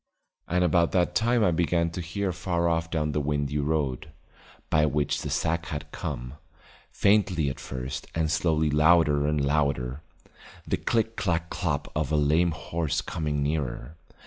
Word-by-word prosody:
And 90 +1 +1
about 85 -1 +2
that 90 -2 +2
time 120 0 +2
I 90 - +4
began 85 0 +1
to 90 - -5
hear 95 +3 -2
far 85 -1 -1
off 80 0 0
down 75 -2 -1
the 75 - 0
windy 75 0 -1
road, 75 -1 -1 0.6
by 75 -1 +4
which 75 -1 0
that - - -4
sack 85 +1 -1
had 75 0 -6
come, 65 -6 -5 0.6
faintly 95 -7 +2
at - - -9
first 65 +2 -5
and 80 -1 0
slowly 80 -1 +1
louder 75 -1 +4
and 75 0 +1
louder, 70 -2 0 0.6
the - - 0
click 115 0 0
clack 85 -4 -1
clop 75 -6 -2
of 75 -1 -1
a 75 - +3
lame 80 +4 +3
horse 80 -1 -2
coming 75 -3 -2
nearer. 70 -2 -3
80 Hz, 160 wpm, -27 LUFS, 75-85 Hz, 0.6 s, I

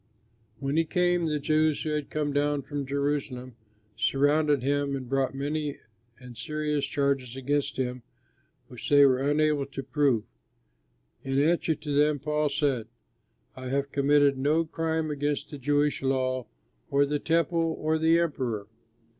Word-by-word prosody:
When 140 +2 -2
he 165 - +4
came, 175 0 +1
the 150 -1 0
Jews 155 +1 +1
who 155 - -2
had 150 -2 -2
come 150 -2 -2
down 145 0 +1
from 145 -1 -5
Jerusalem 140 -3 -2 0.4
surrounded 145 0 +2
him 140 0 0
and 130 -2 -6
brought 135 +1 0
many 145 +1 -2 0.4
and 125 -2 -11
serious 150 +1 -2
charges 140 -3 -1
against 140 +2 -1
him 125 -1 -2 0.7
which 125 -3 -8
they 145 -1 +7
were 130 -2 +3
unable 145 0 +1
to 135 0 -6
prove. 135 -5 +1 1.0
In 135 0 -1
answer 160 +1 +2
to 145 0 -5
them 150 +1 +3
Paul 150 +1 0
said, 140 -6 0 0.7
"I 130 0 -7
have 140 +2 -1
committed 140 -1 +3
no 155 +4 +2
crime 160 -1 -2
against 145 0 -2
the 145 - -7
Jewish 145 +2 +1
law 130 -2 0 0.4
or 140 0 +3
the 145 +1 -1
Temple 165 0 +1
or 155 +1 0
the 160 +1 +4
Emperor." 130 -11 -1
145 Hz, 150 wpm, -27 LUFS, 135-150 Hz, 1.0 s, they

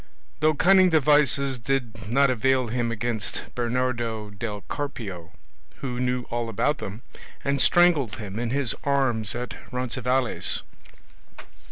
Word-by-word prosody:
Though 155 +1 +3
cunning 185 +4 +5
devices 145 -4 +3
did 115 -4 -3
not 135 +3 +4
avail 130 0 +1
him 120 0 -1
against 115 -1 -2
Bernardo 120 -3 -2
del 105 0 -5
Carpio, 100 - -6 0.4
who 125 -3 -5
knew 125 0 0
all 120 -1 -2
about 115 +8 0
them, 105 +5 -7 0.4
and 140 -1 +1
strangled 165 -10 +4
him 105 -1 -6
in 120 -1 -2
his 135 -1 0
arms 130 -7 +1
at 125 +1 -4 0.2
Roncesvalles. 125 0 0
125 Hz, 125 wpm, -25 LUFS, 115-140 Hz, 0.4 s, cunning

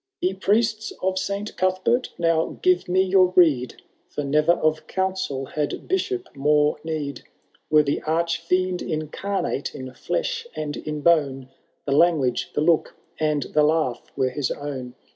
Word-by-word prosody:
Ye 185 - 0
Priests 215 +3 +1
of 190 0 +1
Saint 200 +2 -4
Cuthbeitt 185 +7 +1
now 165 -1 +1
give 365 0 +3
me 185 +1 +4
your 185 -1 +4
rede. 140 -9 +3 0.3
For 150 - -4
never 150 +4 +3
of 155 -2 0
counsel 190 -8 -2
had 150 +1 -3
Bishop 375 0 -1
more 150 +2 +2
need! 155 -3 -4 0.5
Were 155 -1 +5
the 145 0 -1
arch 165 +1 0
fiend 180 +2 0
incarnate 155 +1 -3
in 130 -1 -7
flesh 480 - -2
and 150 -1 -3
in 150 -1 -5
bone, 140 -6 +2 0.4
The 140 - -2
language, 145 -5 +2
the - - +1
look, 160 0 +2 0.2
and 150 -2 +1
the 150 - +1
laugh, 150 -5 +1 0.2
were 130 -2 +1
his 140 +1 -2
own. 130 -4 -5
160 Hz, 150 wpm, -23 LUFS, 145-185 Hz, 0.5 s, Were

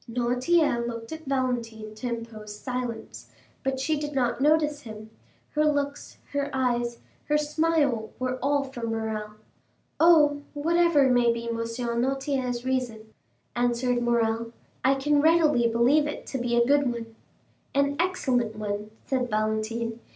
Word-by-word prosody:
Noirtier 245 +3 +2
looked 230 -1 -6
at 320 0 -7
Valentine 235 -5 -2
to 220 +4 -5
impose 220 -3 -6
silence, 250 -3 -5 0.3
but 270 0 -1
she 305 +2 0
did 295 -1 -5
not 245 -1 0
notice 300 0 +3
him; 220 -3 -10 0.4
her 300 - +1
looks, 285 -1 -1
her 285 0 -1
eyes, 240 -2 0 0.3
her 300 - +2
smile, 300 -6 +1
were 255 0 -2
all 285 +1 +2
for 265 -3 -8
Morrel. 220 -2 -3 0.7
"Oh, 300 -3 +5
whatever 330 -1 +3
may 240 -1 +4
be 235 0 -4
M. 230 - -2
Noirtier's 245 +2 -1
reason," 235 -4 -2 0.4
answered 245 0 +1
Morrel, 230 -1 +1 0.3
"I 270 +1 +4
can 290 +2 +2
readily 310 -6 +4
believe 245 +6 +3
it 295 - -6
to 265 - -3
be 240 0 0
a 235 - +5
good 280 -1 +3
one." 230 -1 -7 0.6
"An 280 0 +2
excellent 255 -11 0
one," 210 0 -4 0.2
said 255 -2 -1
Valentine. 220 +2 -1
250 Hz, 140 wpm, -26 LUFS, 230-285 Hz, 0.7 s, Oh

